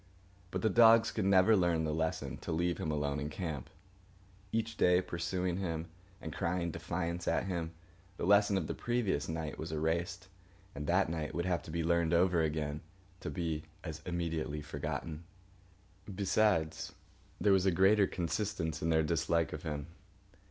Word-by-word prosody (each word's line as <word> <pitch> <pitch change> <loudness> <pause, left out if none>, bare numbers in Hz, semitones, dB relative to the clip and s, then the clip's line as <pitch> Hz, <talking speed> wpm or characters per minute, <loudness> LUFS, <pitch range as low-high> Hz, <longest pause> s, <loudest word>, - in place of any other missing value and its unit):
But 95 0 -3
the 110 - +4
dogs 115 +2 +7
could 105 - -1
never 100 +3 +6
learn 85 -4 +2
the 75 -1 -1
lesson 80 0 -2
to - - -6
leave 85 +2 0
him 80 - -2
alone 75 -1 -1
in 75 +1 -3
camp. 80 -6 -5 0.8
Each 115 0 -1
day, 90 -2 +4
pursuing 90 0 -2
him 85 -3 -3 0.3
and 80 - -6
crying 85 0 -1
defiance 85 +1 -3
at - - +1
him, 85 -3 -3 0.4
the - - -2
lesson 100 +1 +5
of 90 - -1
the - - -3
previous 115 -12 -1
night 80 -1 -4
was 80 - -5
erased, 85 +3 -1 0.5
and 75 +1 -5
that 95 +3 +3
night 80 -1 -3
would 85 +1 -1
have 90 -2 0
to - - -12
be 85 +1 -1
learned 85 0 +2
over 90 -1 +4
again, 75 -1 -1 0.4
to - - -5
be 80 -4 -2 0.2
as 80 0 -6
immediately 80 -4 -2
forgotten. 75 +2 -4 0.9
Besides, 95 -5 +1 0.5
there 100 -1 +4
was 95 0 +3
a - - +5
greater 95 +3 +5
consistence 85 -3 -2
in 80 - 0
their 80 -1 +3
dislike 85 +1 +1
of 75 - -5
him. 75 -3 -4
85 Hz, 165 wpm, -33 LUFS, 80-95 Hz, 0.9 s, dogs